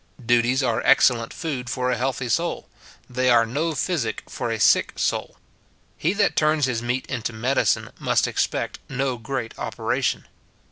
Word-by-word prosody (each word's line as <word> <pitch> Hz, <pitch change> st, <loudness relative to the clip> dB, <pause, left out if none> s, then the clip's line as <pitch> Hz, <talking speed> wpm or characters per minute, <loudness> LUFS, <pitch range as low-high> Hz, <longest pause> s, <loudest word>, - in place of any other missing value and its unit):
Duties 120 Hz, +3 st, +3 dB
are 120 Hz, -3 st, +1 dB
excellent 115 Hz, -3 st, +4 dB
food 135 Hz, -7 st, -4 dB
for 125 Hz, -1 st, -1 dB
a -, -, +1 dB
healthy 130 Hz, +1 st, -2 dB
soul; 170 Hz, +9 st, -1 dB, 0.4 s
they 130 Hz, +1 st, 0 dB
are 115 Hz, -2 st, +5 dB
no 150 Hz, +8 st, -2 dB
physic 130 Hz, -, -1 dB
for 120 Hz, -3 st, -4 dB
a 115 Hz, -1 st, -2 dB
sick -, -, +4 dB
soul. -, -, -2 dB, 0.6 s
He 170 Hz, +5 st, 0 dB
that 205 Hz, 0 st, +1 dB
turns 155 Hz, -1 st, +3 dB
his 120 Hz, -3 st, -1 dB
meat 125 Hz, +2 st, -2 dB
into 120 Hz, -2 st, -3 dB
his 110 Hz, -, -11 dB
medicine 130 Hz, +4 st, +1 dB
must -, -, +2 dB
expect -, -, -2 dB
no 135 Hz, -2 st, -2 dB
great 115 Hz, -1 st, -4 dB
operation. -, -, -1 dB
125 Hz, 160 wpm, -23 LUFS, 120-140 Hz, 0.6 s, are